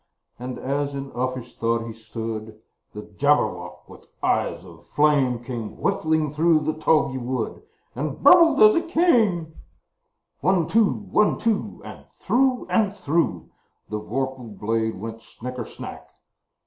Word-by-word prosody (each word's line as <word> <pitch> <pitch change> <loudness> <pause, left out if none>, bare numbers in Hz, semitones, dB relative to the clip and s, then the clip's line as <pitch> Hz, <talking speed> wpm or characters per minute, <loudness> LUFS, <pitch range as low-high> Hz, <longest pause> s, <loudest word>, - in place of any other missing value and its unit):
And, 125 +1 -5
as 140 +1 -2
in 135 0 -6
uffish 130 -1 -4
thought 115 0 0
he 115 - -7
stood, 110 -1 -7 0.3
The 105 - -7
Jabberwock, 105 -7 -1
with - - -15 0.2
eyes - - 0
of - - -15
flame, 135 -5 +2
Came 120 -3 -6
whiffling 160 -6 0
through 160 +1 +3
the 155 +1 -1
tulgey 155 -4 +1
wood, 125 -2 -3 0.3
And 145 +2 -3
burbled 335 +3 +7
as 425 -1 +7
it 335 0 -1
came! 220 - +2 0.9
One, 185 -4 +2
two! 220 -2 +4
One, 210 0 +1
two! 225 -3 -2
And - - -10 0.2
through 255 0 +1
and 205 -3 +1
through 165 -1 -1 0.4
The 105 - -3
vorpal 125 -1 -4
blade 110 -1 -1
went 115 +2 -7
snicker 125 0 -7
snack! - - -10
135 Hz, 135 wpm, -23 LUFS, 115-170 Hz, 0.9 s, burbled